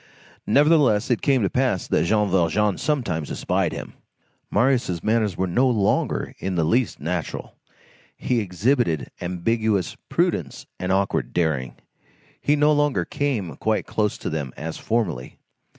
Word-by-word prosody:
Nevertheless, 140 -4 +4
it 120 - +1
came 135 -5 +2
to 95 - +2
pass 125 -9 0
that 80 - +2
Jean 105 +2 +2
Valjean 95 +2 +1
sometimes 100 - -1
espied - - 0
him. - - -7 0.6
Marius' 120 -10 +1
manners 110 -5 +1
were 95 - +1
no 125 +9 +2
longer 105 -5 0
in 95 -1 -3
the 85 - +2
least 115 +9 +1
natural. 85 +2 -4 0.6
He 125 -2 0
exhibited 100 - 0
ambiguous 100 +2 0
prudence - - -1
and 90 +1 -2
awkward 95 +1 0
daring. 75 -7 0 0.7
He 145 - +3
no 150 +1 +4
longer 145 -2 +1
came 110 - -2
quite 110 -1 0
close 105 -2 -1
to - - -4
them 75 -5 -3
as 80 +1 -5
formerly. 105 - -2
105 Hz, 140 wpm, -23 LUFS, 85-125 Hz, 0.7 s, Nevertheless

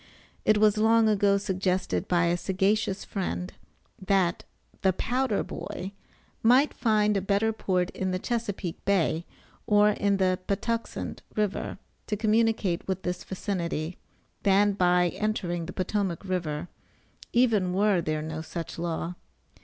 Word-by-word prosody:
It 215 - +5
was 215 0 +4
long 225 +1 +5
ago 200 -1 +3
suggested 185 - -1
by 175 -1 +3
a 170 +1 +2
sagacious 195 +2 0
friend, 180 -2 -3 0.5
that 190 -3 +1 0.4
the 190 -2 +3
"powder 250 +2 0
boy" 190 +2 -6 0.5
might 255 +6 +5
find 215 -3 +2
a 195 - +1
better 205 +3 +1
port 185 -4 0
in 190 - -2
the 185 - 0
Chesapeake 205 -5 -3
bay, 175 -4 +1 0.4
or 210 0 +5
in 200 -1 +1
the 185 -1 +2
Patuxent 230 +3 -2
river 210 -2 -1 0.3
to 210 - -1
communicate 220 -4 +1
with 190 -1 -2
this 180 0 -3
vicinity, 175 -4 -3 0.4
than 205 +1 +4
by 180 -2 +3
entering 175 -5 -2
the - - -5
Potomac 190 -1 -2
river, 175 -4 -2 0.6
even 225 -7 +3
were 195 -1 +3
there 155 -1 -2
no 155 0 -4
such 165 +1 -6
law. 170 0 -2
195 Hz, 135 wpm, -27 LUFS, 180-210 Hz, 0.6 s, It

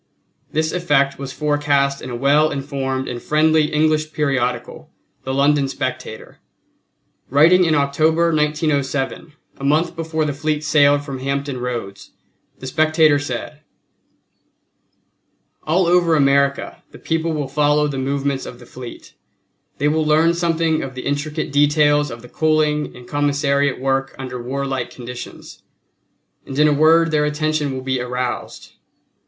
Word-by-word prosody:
This 155 +1 0
effect 145 -6 +1
was 135 -1 -6
forecast 145 -2 0
in 130 - -7
a 120 - -4
well 145 +5 +3
informed 135 -2 -3
and 120 -1 -5
friendly 155 0 +3
English 155 0 +1
periodical, 130 -5 -2 0.4
the 130 - -2
London 140 +1 +2
Spectator. 135 - -6 0.9
Writing 165 +7 +5
in 160 -2 +2
October, 155 +4 +2
1907, 150 -1 -1 0.3
a - - -9
month 155 +5 +1
before 160 -1 -2
the 145 - -2
fleet 150 +1 -2
sailed 145 -1 +3
from 135 -3 -6
Hampton 140 0 -3
Roads, 120 -6 -6 0.4
the - - -10
Spectator 155 +1 +3
said: 145 +2 -5 2.1
"All 175 +4 +2
over 170 -1 +3
America 140 -1 +1
the - - -14
people 165 0 -2
will 145 -3 -2
follow 150 +1 +2
the 140 -2 -4
movements 140 0 -2
of 125 - -9
the 120 - -14
fleet; 125 0 -11 0.6
they 145 - +1
will 155 +1 +1
learn 155 +2 +3
something 165 -2 0
of 130 -1 -7
the 125 - -7
intricate 150 +2 -2
details 145 0 +3
of 115 0 -9
the - - -11
coaling 155 0 0
and 125 0 -13
commissariat 140 -1 0
work 135 0 -1
under 125 -2 -6
warlike 135 0 -3
conditions; 125 0 -10 0.8
and 135 - -8
in 150 +1 +5
a 150 - +3
word 160 +2 +4
their 150 -1 +2
attention 150 -1 -1
will 130 0 -5
be 130 -1 -1
aroused. 125 -1 -4
145 Hz, 140 wpm, -20 LUFS, 135-155 Hz, 2.1 s, Writing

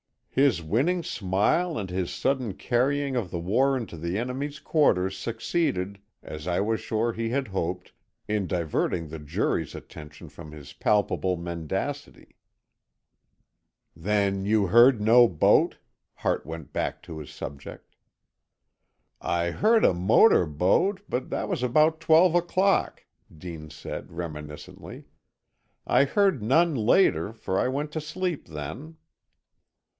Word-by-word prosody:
His 135 -11 +2
winning 145 - 0
smile 105 - 0
and 100 -3 -4
his 90 -1 -2
sudden 130 -6 -1
carrying 135 +5 0
of 115 -7 -2
the - - -3
war 130 +10 +2
into 110 -9 -7
the 85 +4 -3
enemy's 135 +5 -4
quarters 95 - +2
succeeded, 110 - -2 0.2
as 75 +2 -8
I 90 0 0
was 110 +2 0
sure 115 +2 -1
he 115 0 -3
had 130 -1 -2
hoped, 90 -1 -3 0.4
in 105 -3 0
diverting 85 -1 -1
the 80 +1 -7
jury's 75 0 -2
attention 75 -1 -11
from 75 - -12
his 70 -2 -11
palpable 100 -3 +1
mendacity. 85 -2 -5 1.6
"Then 100 +2 0
you 105 -1 +2
heard 120 +4 +6
no 120 +3 +6
boat?" 85 -7 +3 0.4
Hart - - -1
went 80 -2 -8
back - - -3
to 80 - -8
his 75 - -9
subject. 70 0 -9 1.2
"I 85 0 -1
heard 220 - +3
a - - +5
motor 90 - +4
boat, 95 - +1
but 125 +1 -3
that - - -3
was - - -2
about 155 +6 +3
twelve 165 +2 +5
o'clock," 185 +3 +1 0.3
Dean 80 -2 -8
said, 75 0 -8
reminiscently. 75 -3 -8 0.8
"I 140 - +4
heard 195 - +2
none 160 +10 +3
later, 110 - +2
for 95 -4 -2
I - - +1
went 145 +3 -3
to 155 - -3
sleep 170 +2 -4
then." 80 - -7
105 Hz, 130 wpm, -26 LUFS, 85-140 Hz, 1.6 s, heard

